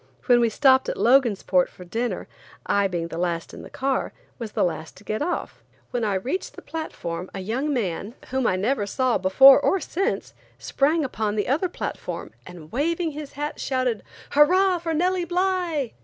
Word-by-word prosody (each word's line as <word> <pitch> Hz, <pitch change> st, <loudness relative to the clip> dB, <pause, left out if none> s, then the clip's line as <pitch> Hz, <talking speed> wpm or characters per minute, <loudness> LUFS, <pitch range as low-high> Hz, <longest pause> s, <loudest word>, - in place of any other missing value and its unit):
When 245 Hz, -2 st, +5 dB
we 235 Hz, -1 st, +3 dB
stopped 260 Hz, +3 st, +4 dB
at -, -, -3 dB
Logansport 225 Hz, -7 st, +3 dB
for 180 Hz, -, -13 dB
dinner, 230 Hz, +7 st, -3 dB, 0.4 s
I 200 Hz, -1 st, +2 dB
being 170 Hz, -3 st, -3 dB
the 165 Hz, -, -5 dB
last 170 Hz, -1 st, -2 dB
in -, -, -9 dB
the -, -, -11 dB
car, 270 Hz, 0 st, -1 dB, 0.3 s
was 225 Hz, -3 st, -6 dB
the -, -, +1 dB
last 160 Hz, -1 st, -3 dB
to 200 Hz, -, -15 dB
get 215 Hz, +1 st, -3 dB
off. 350 Hz, +4 st, -3 dB, 0.3 s
When 245 Hz, -3 st, -1 dB
I 205 Hz, -2 st, +1 dB
reached 255 Hz, -, -3 dB
the -, -, -11 dB
platform 185 Hz, -, -5 dB
a -, -, -4 dB
young 240 Hz, +10 st, -2 dB
man, 210 Hz, -2 st, -2 dB
whom 260 Hz, -1 st, 0 dB
I -, -, +2 dB
never 205 Hz, +2 st, 0 dB
saw 255 Hz, +3 st, +1 dB
before 265 Hz, +10 st, +8 dB
or 380 Hz, +6 st, +2 dB
since, 390 Hz, +6 st, -2 dB, 0.2 s
sprang 305 Hz, +3 st, +1 dB
upon 215 Hz, -4 st, -2 dB
the 210 Hz, -, -1 dB
other 320 Hz, +8 st, +1 dB
platform, -, -, -5 dB, 0.2 s
and 170 Hz, -4 st, -11 dB
waving 325 Hz, +5 st, 0 dB
his 295 Hz, -1 st, -8 dB
hat, 295 Hz, +1 st, -4 dB
shouted: 255 Hz, -5 st, -1 dB, 0.3 s
"Hurrah 360 Hz, +5 st, +4 dB
for 330 Hz, -1 st, -2 dB
Nellie 360 Hz, +2 st, +1 dB
Bly!" 350 Hz, -7 st, 0 dB
255 Hz, 185 wpm, -24 LUFS, 200-305 Hz, 0.4 s, before